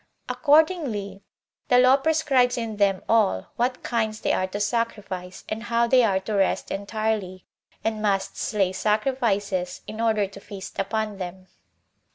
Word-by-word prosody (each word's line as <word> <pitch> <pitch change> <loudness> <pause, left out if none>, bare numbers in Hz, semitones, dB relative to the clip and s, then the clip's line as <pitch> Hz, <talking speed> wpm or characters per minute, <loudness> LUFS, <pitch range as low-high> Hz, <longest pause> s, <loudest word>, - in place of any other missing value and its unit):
Accordingly, 285 - +2 0.5
the 245 - +4
law 255 +1 +7
prescribes 275 -4 +2
in 225 -3 -4
them 200 -2 +2
all 210 - +2
what 250 +2 -1
kinds 220 -2 -1
they - - +1
are 185 - 0
to 200 +2 -5
sacrifice, 205 -5 -3
and 215 +1 -4
how 235 0 +1
they 255 +2 +5
are 195 -4 +2
to 215 +3 -4
rest 195 -2 +1
entirely, 200 -2 -2 0.4
and 220 -1 -1
must 200 -2 0
slay 195 -4 0
sacrifices, 210 -3 0
in 215 +1 -6
order 220 -3 +2
to 195 +1 -11
feast 200 -1 -9
upon 210 +1 -2
them. 185 0 -6
215 Hz, 150 wpm, -25 LUFS, 195-235 Hz, 0.5 s, law